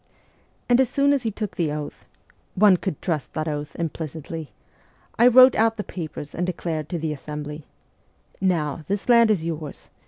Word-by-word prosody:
And 245 +1 +5
as 260 - +1
soon 280 0 +3
as 280 - +1
he 230 - -1
took 210 -1 -5
the 160 -4 0
oath 150 -1 -6 0.5
one 200 0 +6
could 180 -4 -4
trust 160 -6 -2
that 155 0 -2
oath 150 -1 -4
implicitly 160 -1 -5 0.7
I 240 - +7
wrote 255 +1 +8
out 225 0 +2
the 210 - -3
papers 155 -6 -7
and 175 - -2
declared 165 -4 -3
to 175 - -2
the 160 -1 -2
assembly: 150 +1 -7 0.4
" - - -36 0.2
Now, 150 0 -4
this 200 0 -2
land 235 -2 +6
is 185 -7 +1
yours. 155 -3 -6
165 Hz, 180 wpm, -23 LUFS, 150-215 Hz, 0.7 s, wrote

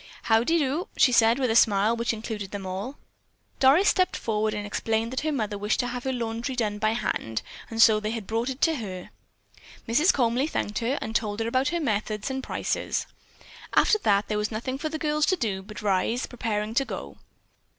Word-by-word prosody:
"Howdy 235 +9 +3
do," 295 +3 0
she 255 - +5
said 230 0 +5
with 255 -4 +1
a - - 0
smile 215 0 +4
which 235 0 0
included 215 -3 -5
them 200 -1 -6
all. 195 +9 -5 0.6
Doris 285 +10 +5
stepped 370 -1 +2
forward 215 -1 -1
and 210 0 -4
explained 225 +3 -1
that 260 - -1
her 310 +1 -1
mother 215 -7 -2
wished 210 +1 0
to - - -3
have 245 +1 -5
her 265 - 0
laundry 235 +1 -3
done 210 -4 -1
by 215 +1 +2
hand, 115 - -2 0.3
and 225 - -5
so 220 -2 +7
they 215 0 -3
had 225 -2 -4
brought 230 +4 -1
it 265 +1 -6
to 325 -2 +3
her. 185 -6 -7 0.8
Mrs. 300 +11 +4
Comely 250 +2 +1
thanked 210 -10 -2
her 245 +5 -1
and 220 - -6
told 210 -2 -1
about 255 +4 +1
her 345 +2 0
methods 215 -3 -2
and 265 0 -3
prices. - - -2 0.7
After 430 - +4
that 205 - +2
there 210 -1 -1
was 210 - -1
nothing 255 +4 -4
for 310 - -2
the 315 - -4
girls 300 -1 +1
to 375 - +3
do 210 - -2
but 210 +2 -10
rise, 205 +5 +1
preparing 220 -3 -3
to 275 +3 +2
go. 70 - -7
230 Hz, 205 wpm, -26 LUFS, 210-265 Hz, 0.8 s, so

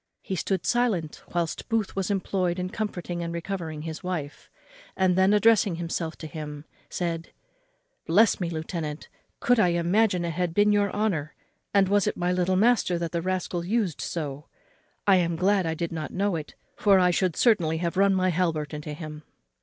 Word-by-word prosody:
He 190 - -3
stood 185 +1 -1
silent 220 -11 0
whilst 170 -2 -2
Booth 225 -3 0
was 195 -1 -1
employed 185 -2 0
in 185 0 -3
comforting 180 -5 -4
and 170 0 -3
recovering 170 -3 -4
his 160 0 -6
wife; 160 -6 -5 0.5
and 185 -1 +3
then, 190 +1 +4
addressing 210 -3 +4
himself 165 -1 -3
to - - -8
him, 150 -1 -7 0.2
said, 170 -1 -3 0.8
"Bless 205 +7 +4
me! 175 -3 -1
lieutenant, 160 -2 -5 0.3
could 245 -1 +3
I 210 - +5
imagine 175 +2 +2
it 170 - -1
had 175 0 -2
been 210 0 +4
your 205 -1 +2
honour; 180 -9 -1 0.4
and 200 -1 +4
was 200 0 +2
it - - -1
my 175 +1 0
little 180 +1 +1
master 210 -3 +3
that 170 -1 -3
the 170 - -1
rascal 180 -1 -2
used 195 -3 -1
so? 145 -3 -4 0.6
I 195 -2 +6
am 170 -2 +1
glad 190 +1 +2
I 160 - -1
did 170 +1 -3
not 160 -2 -4
know 200 -1 0
it, 155 -2 -6 0.2
for 200 -2 +4
I 180 -1 +4
should 180 -2 +1
certainly 175 -9 +3
have 170 +1 -2
run 195 +1 +4
my 185 0 +2
halbert 165 -4 -1
into 150 0 -5
him." 150 -1 -8
180 Hz, 185 wpm, -26 LUFS, 165-195 Hz, 0.8 s, I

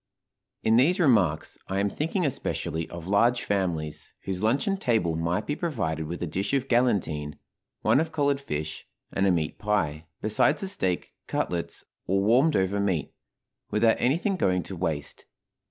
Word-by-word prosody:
In 110 +1 +4
these 160 +10 +4
remarks 105 - +2
I 95 +1 -1
am 100 0 +1
thinking 165 - -1
especially 80 - -2
of 85 0 -8
large 115 +5 +3
families, 80 -6 -2
whose 95 -1 -4
luncheon 140 - +1
table 110 - +1
might 85 +2 -1
be 145 - -1
provided 80 - -2
with 85 +2 -4
a - - +1
dish 95 - -2
of 135 -1 0
galantine, 95 - +1 0.4
one - - +4
of 160 +1 -1
collared 140 -2 +1
fish, 75 - -5 0.3
and 95 0 +2
a - - +4
meat 80 -3 -1
pie, 80 -8 -1
besides 110 +8 +2
the 195 - -3
steak, 95 - -2
cutlets, 85 -1 -2 0.2
or 95 +2 +2
warmed 125 +10 +4
over 95 +1 +1
meat, 95 -8 -1 0.6
without 110 +1 +3
anything 170 +10 +1
going 90 - +1
to 95 - -7
waste. 80 -5 -3
100 Hz, 160 wpm, -27 LUFS, 85-130 Hz, 0.6 s, In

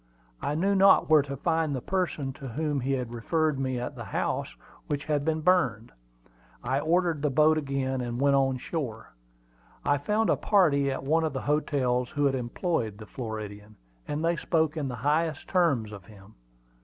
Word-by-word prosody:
I 145 - -1
knew 195 +5 +1
not 195 -4 +5
where 155 -2 +7
to 140 0 -6
find 160 -1 0
the - - -2
person 170 -7 -2
to 135 -2 -9
whom 145 +3 -2
he 135 +2 -1
had 125 -3 -3
referred 155 +4 0
me 130 -2 -1
at 125 +3 -5
the 120 -2 -7
house - - -2 0.3
which 145 0 -3
had 150 -2 0
been 160 +1 0
burned. 140 - +2 0.7
I 135 +1 0
ordered 165 0 +1
the 150 - +1
boat 155 +3 +4
again, 135 -3 -2
and 120 0 -4
went 140 0 +4
on 135 -1 +2
shore. 125 - -5 0.7
I 145 0 +2
found 210 +9 +1
a - - +4
party 150 -9 +3
at 135 0 -3
one 160 +4 +2
of 155 -3 -1
the 135 - -3
hotels 130 -4 0
who 145 0 0
had 140 - +3
employed 120 - -2
the 110 - -10
Floridian, 105 -2 -7 0.3
and 150 +2 -2
they 170 0 +1
spoke 160 0 0
in 150 -3 -2
the 125 - -4
highest 150 +5 0
terms 140 - +1
of 100 -4 -10
him. 100 +1 -16
140 Hz, 190 wpm, -27 LUFS, 125-160 Hz, 0.7 s, where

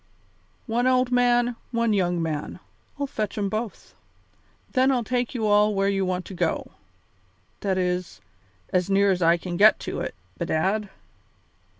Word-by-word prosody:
One 240 +1 0
old 255 -1 +2
man, 245 -1 +3
one 235 -2 +1
young 175 -4 +1
man 155 -2 -4 0.4
I'll 285 - -1
fetch 215 -7 -4
'em 200 -2 0
both. 215 +1 -5 0.8
Then 260 +1 +3
I'll 250 -3 +1
take 245 +1 -2
you 225 -3 -1
all 210 0 +4
where 195 0 +2
you 195 -1 0
want 185 0 -2
to - - -9
go 175 -2 -2 0.9
to. - - -5
That 190 -1 +1
is, 180 -7 -2 0.5
as 180 0 +1
near 200 0 +4
as 180 -1 -1
I 170 0 +4
can 175 0 -5
get 215 +3 +6
to - - -4
it, - - -4 0.2
bedad. 190 +5 0
205 Hz, 165 wpm, -25 LUFS, 180-240 Hz, 0.9 s, get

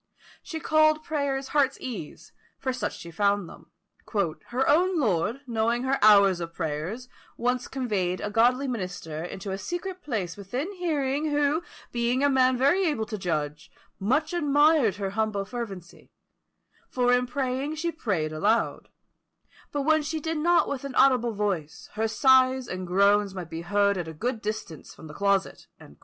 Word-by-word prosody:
She 320 - -6
called 310 0 +3
prayers 280 -3 -2
heart's 275 -2 +1
ease, 225 - -8 0.2
for 260 -1 -2
such 250 - -3
she 170 -2 -10
found 200 +1 +1
them. - - -14 0.8
"Her 255 +2 0
own 350 +4 +3
lord, 215 - 0
knowing 235 0 0
her 265 +1 0
hours 200 -3 +6
of 170 -1 -6
prayers, 165 +10 -4 0.3
once 250 +1 -1
conveyed 205 -9 -1
a 205 - -4
godly 250 +5 +3
minister 180 -9 -4
into 190 +3 -6
a 190 - -3
secret 360 - -5
place 210 - -3
within 245 - -4
hearing, 305 -5 -1
who, 295 +2 +1 0.3
being 240 +3 0
a 285 - +4
man 255 -1 +3
very 285 +10 +3
able 235 -9 -1
to 215 0 -5
judge, 150 -4 -3 0.3
much 280 - 0
admired 295 - +3
her 195 -2 -3
humble 215 -1 -1
fervency; 195 -7 -8 0.8
for 245 -1 +2
in 250 0 +2
praying 265 +3 -2
she 335 +2 -2
prayed 185 - -2
aloud; 210 +9 0 0.8
but 290 -1 -1
when 315 +1 +3
she 315 +2 -3
did 320 +1 -3
not 345 +3 +3
with 275 -2 -4
an 275 -2 -6
audible 245 -4 +4
voice, 190 -7 -3
her 220 +1 0
sighs 260 +2 +4
and 185 0 -5
groans 200 +2 +3
might 175 -4 -7
be 165 0 -5
heard 200 +2 +1
at 170 - -4
a 160 - -6
good 230 +8 -3
distance 205 -7 -6
from - - -13
the 150 - -10
closet." 200 +2 0
240 Hz, 165 wpm, -26 LUFS, 195-280 Hz, 0.8 s, hours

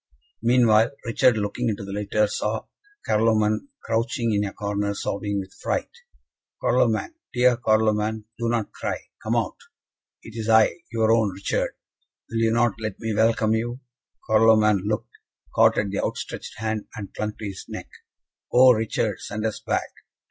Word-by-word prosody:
Meanwhile, 115 -1 +4
Richard, 115 0 +3
looking 110 +4 -1
into 100 -2 -3
the 100 - -7
litter, 105 +1 +1
saw 105 +1 -2 0.4
Carloman 110 - +2 0.2
crouching 115 0 0
in 105 0 +2
a 100 - -3
corner, 100 0 -2
sobbing 100 0 -2
with 95 -1 -8
fright. - - -2 0.7
"Carloman! 355 -2 +1 0.2
dear 125 0 +4
Carloman! 110 -1 +1
do 115 0 0
not 115 -3 -1
cry. - - -3 0.2
Come - - -1
out! - - -1 0.7
It 115 - -11
is 110 -1 -3
I 110 +7 +5
your 110 -1 +2
own 115 -2 +3
Richard! 95 +1 -2 0.6
Will 115 - -1
you 115 0 +3
not 115 -2 +2
let 110 -3 -4
me 115 -1 -2
welcome 110 0 +2
you?" 120 +3 -2 0.5
Carloman 110 -2 +4
looked, 105 0 -3 0.3
caught - - +5
at 100 -2 0
the 100 - -1
outstretched - - -5
hand, 110 -1 -3
and 100 -3 -7
clung 105 0 -3
to 110 - -7
his 95 -2 -6
neck. - - -7 0.6
"Oh, 130 +1 +8
Richard, 110 -2 0
send 110 +1 -4
us 110 - -2
back! - - -2
110 Hz, 155 wpm, -24 LUFS, 105-115 Hz, 0.7 s, Oh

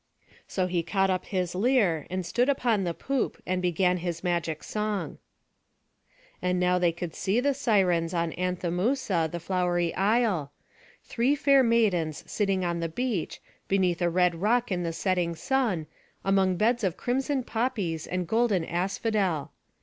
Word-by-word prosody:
So 185 - -1
he 180 -1 0
caught 195 +2 +1
up 185 - -1
his 180 -3 -1
lyre, 195 - +2
and 185 0 -3
stood 245 +9 +1
upon 235 -8 +1
the 170 - -1
poop, 275 -2 -2
and 185 0 -1
began 180 +1 +2
his 170 -1 -4
magic 170 -3 -1
song. 210 -1 -3 1.2
And 180 0 0
now 180 0 +2
they 175 -1 +3
could 170 -1 -6
see 195 +5 0
the 280 +2 +2
Sirens, 190 -10 +2
on 170 -2 -1
Anthemousa, 180 +1 0
the 175 - -4
flowery 175 -1 0
isle; 200 - +1 0.5
three 255 +5 +1
fair 275 -1 +4
maidens 200 - +1
sitting 195 -3 0
on 170 -1 -1
the 165 0 -2
beach, 225 -1 -3 0.2
beneath 185 -3 +1
a 175 - +3
red 180 0 +3
rock 235 +2 +2
in 180 -1 0
the 170 -1 -2
setting 175 -1 0
sun, 225 - 0 0.4
among 190 -2 +2
beds 230 +3 +2
of 185 -4 0
crimson 265 +2 -1
poppies 210 -10 -2
and 180 -1 -2
golden 220 -5 +2
asphodel. 185 -3 -1
185 Hz, 155 wpm, -27 LUFS, 175-225 Hz, 1.2 s, fair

